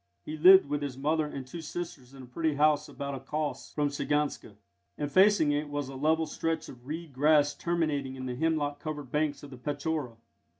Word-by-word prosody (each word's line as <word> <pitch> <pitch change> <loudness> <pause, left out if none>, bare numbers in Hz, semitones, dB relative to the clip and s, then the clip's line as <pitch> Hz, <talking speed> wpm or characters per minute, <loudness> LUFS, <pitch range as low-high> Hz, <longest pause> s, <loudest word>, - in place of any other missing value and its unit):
He 155 - -5
lived 190 +5 +8
with 145 +1 -2
his 140 -3 -4
mother 155 +2 +1
and 135 -3 -6
two 165 +6 -8
sisters 150 -5 -7
in 135 - -10
a - - -9
pretty 155 +5 -1
house 150 0 +3
about 140 -1 -5
a 135 - -4
kös 150 +3 -4
from 145 -1 0
Shiganska, 145 -6 -2 0.4
and 145 -1 -3
facing 190 -5 +5
it 145 +1 -1
was 145 -2 -3
a 135 - -8
level 160 +4 +2
stretch 165 0 -2
of 125 0 -13
reed 160 0 -6
grass 145 +2 +4
terminating 155 -6 -1
in 130 -1 -6
the 125 - -3
hemlock 145 -1 0
covered 150 -4 -6
banks 150 -1 0
of 140 - -10
the 130 - -9
Petchora. 145 -2 -3
145 Hz, 205 wpm, -29 LUFS, 140-155 Hz, 0.4 s, lived